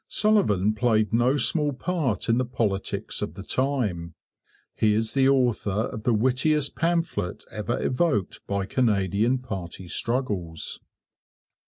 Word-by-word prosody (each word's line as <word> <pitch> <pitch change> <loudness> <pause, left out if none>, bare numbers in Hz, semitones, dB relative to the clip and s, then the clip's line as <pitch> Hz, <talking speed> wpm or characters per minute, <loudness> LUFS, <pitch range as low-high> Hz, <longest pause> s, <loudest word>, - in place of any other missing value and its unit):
Sullivan 110 - +3
played 110 -1 +1
no 125 +4 +3
small 145 +1 +1
part 150 - -1
in 115 +1 +3
the - - +2
politics 110 -6 -2
of - - -4
the 95 - -7
time. 105 - -1 0.6
He 105 -1 +2
is 110 0 -1
the 135 -1 +4
author 120 -5 +1
of 110 - -5
the 120 - +3
wittiest 135 +6 +1
pamphlet 165 - -1
ever 110 +2 -2
evoked 125 - 0
by 100 -1 -1
Canadian 105 +1 +1
party 95 -7 -7
struggles. 100 -8 -3
115 Hz, 130 wpm, -25 LUFS, 100-135 Hz, 0.6 s, the